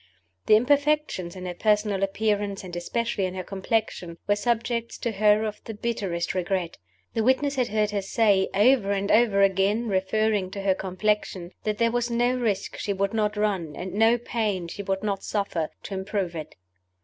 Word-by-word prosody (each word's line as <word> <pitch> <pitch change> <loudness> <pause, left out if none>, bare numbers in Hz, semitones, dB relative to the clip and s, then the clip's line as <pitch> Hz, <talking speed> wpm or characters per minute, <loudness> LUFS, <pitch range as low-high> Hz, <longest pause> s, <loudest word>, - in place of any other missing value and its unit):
The - - +7
imperfections 285 - +1
in 185 -1 -7
her 180 - -3
personal 210 0 +1
appearance 200 0 0
and 180 -2 -7
especially 205 +3 -1
in 185 0 -4
her 185 - -4
complexion 190 -3 -2
were 205 - +4
subjects 235 +1 -1
to 235 - -2
her 210 +1 +3
of 215 -1 -5
the 225 - -6
bitterest 200 -6 -2
regret. 180 -1 -2 0.3
The 225 - 0
witness 260 +4 +2
had 255 -3 0
heard 210 0 0
her 205 -1 -1
say, 195 -1 +2
over 205 -1 +4
and 200 0 -1
over 215 -3 +4
again 195 +4 +2
(referring 200 +1 +1
to 200 - -5
her 195 -1 +3
complexion), 190 -1 -2
that 210 -1 0
there 230 +1 +2
was 240 0 0
no 240 +1 +2
risk 225 -6 -1
she 205 - -2
would 200 +1 -1
not 210 -1 0
run, 190 -8 -1
and 185 +1 -6
no 225 +3 +4
pain 215 -7 -2
she 185 - -6
would 195 0 -2
not 200 -2 -2
suffer, 190 -6 -2
to - - -6
improve 190 -2 -2
it. 155 -1 -7
205 Hz, 185 wpm, -26 LUFS, 190-225 Hz, 0.3 s, The